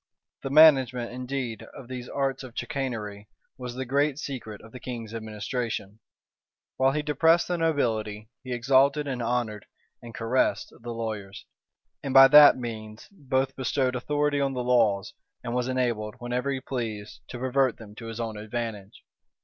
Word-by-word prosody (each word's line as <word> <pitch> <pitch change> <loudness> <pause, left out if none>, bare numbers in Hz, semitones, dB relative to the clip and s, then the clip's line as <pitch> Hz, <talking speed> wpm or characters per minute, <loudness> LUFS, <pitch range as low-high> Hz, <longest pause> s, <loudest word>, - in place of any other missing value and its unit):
The 135 - -4
management, 135 -5 +5
indeed, 125 -2 -4
of 125 - -10
these 125 -1 -7
arts 135 -2 -1
of 130 -3 -11
chicanery, 105 -6 -4 0.3
was 125 -1 -7
the 130 +1 -4
great 140 +2 +1
secret 120 -8 -6
of 110 - -14
the 125 - -9
king's 115 -4 -7
administration. 110 -1 -4 0.8
While 135 +1 +3
he 150 0 -1
depressed 160 +3 +3
the 175 -1 -1
nobility, 110 -9 -1 0.2
he 130 - -7
exalted, 135 +4 +3
and 130 -3 -3
honored, 115 -3 -2 0.3
and 120 - -10
caressed 115 +3 0
the 120 0 -9
lawyers; 110 -4 -5 0.6
and 135 -1 -4
by 135 0 +11
that 150 -1 +9
means 110 -3 -7
both 135 -7 -1
bestowed 130 -1 0
authority 145 +2 0
on 135 -1 0
the 125 -1 -2
laws, 115 -6 +2 0.3
and 120 -1 -4
was 125 0 0
enabled, 120 -5 -1
whenever 125 +2 -2
he 135 -1 -2
pleased, 110 -7 -5
to 120 - -7
pervert 130 0 +1
them 105 -2 -12
to 115 - -8
his 115 0 -6
own 110 -2 -4
advantage. 105 -1 -6
125 Hz, 160 wpm, -26 LUFS, 110-135 Hz, 0.8 s, by